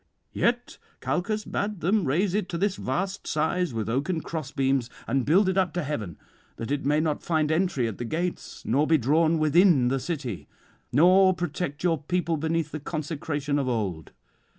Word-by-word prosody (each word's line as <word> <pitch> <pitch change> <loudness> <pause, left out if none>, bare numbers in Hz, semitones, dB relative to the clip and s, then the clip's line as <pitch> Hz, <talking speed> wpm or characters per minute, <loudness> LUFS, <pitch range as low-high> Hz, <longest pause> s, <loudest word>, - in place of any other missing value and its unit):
Yet 240 +1 0 0.2
Calchas 215 +4 -1
bade 205 -3 -3
them 195 +2 +2
raise 175 +8 +1
it 205 -2 -1
to 170 - -3
this 200 +2 0
vast 195 +2 -3
size 160 +2 0
with 110 -3 -3
oaken 145 +8 -1
crossbeams, 135 -6 -1 0.2
and 135 -1 0
build 185 +6 +4
it 190 +1 +2
up 185 -2 0
to 175 - -1
heaven, 110 - -4 0.4
that 115 +4 -5
it 145 -1 -1
may 150 +1 +3
not 155 -1 0
find 155 -2 0
entry 160 -7 +1
at 110 - -6
the 120 - -3
gates 170 +8 -4
nor 145 +6 +2
be 160 - +5
drawn 155 +5 +2
within 155 -4 +4
the 135 +1 0
city, 135 - -4 0.4
nor 185 +6 +5
protect 170 -3 -4
your 165 -4 +1
people 170 +1 0
beneath 160 0 -1
the 155 - -4
consecration 150 -1 -3
of 135 - -1
old. 95 - -3
155 Hz, 175 wpm, -26 LUFS, 140-180 Hz, 0.4 s, be